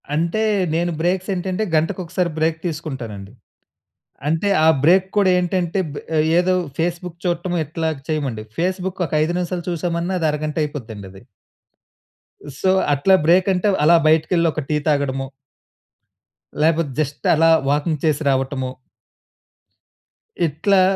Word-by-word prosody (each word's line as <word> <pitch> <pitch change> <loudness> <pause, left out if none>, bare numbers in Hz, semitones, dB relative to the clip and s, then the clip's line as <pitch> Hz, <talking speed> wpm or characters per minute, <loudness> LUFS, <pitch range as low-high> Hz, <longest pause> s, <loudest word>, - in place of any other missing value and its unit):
అంటే 170 +7 0 0.3
నేను 175 +1 0
బ్రేక్స్ 180 +3 0
ఏంటంటే, 185 +3 -2
గంటకొకసారి 180 +2 -1
బ్రేక్ 160 +1 0
తీసుకుంటానండి. 130 - -6 1.0
అంటే 165 +6 +1
ఆ - - +5 0.2
బ్రేక్ 180 +4 +5
కూడా 200 -2 +4
ఏంటంటే 180 0 0
బె - - -6 0.4
ఏదో 185 +1 +2 0.2
ఫేస్‌బుక్ 175 +1 -2
చూట్టము 175 0 -1
ఇట్లాగ 160 +1 -2
చేయమండి. 135 -8 -2
ఫేస్‌బుక్ 185 +2 -2
ఒక 160 - -8
5 165 +3 -1
నిమిషాలు, 180 0 -3
చూసామన్నా 170 +1 -2
అది 160 - +1
అరగంట 150 +1 -4
అయిపోద్దండి 115 -9 -6
అది. 95 0 -14 1.4
సో, 190 - +1 0.2
అట్లా 145 +7 +4
బ్రేక్ 180 +4 +4
అంటే, 180 +3 0 0.2
అలా 165 +3 +6
బయటికెళ్ళి 165 +2 +3
ఒక 155 - -3
టీ 155 - +1
తాగడము. 135 -2 0 1.3
లేపోతే, 160 -1 +2
జస్ట్ 145 -1 -3
అలా 165 +1 +4 0.2
వాకింగ్ 150 +2 0
చేసి 155 -1 +1
రావటము. 130 -1 -1 1.8
ఇట్లా, 185 +6 +2
165 Hz, 125 wpm, -20 LUFS, 150-180 Hz, 1.8 s, అలా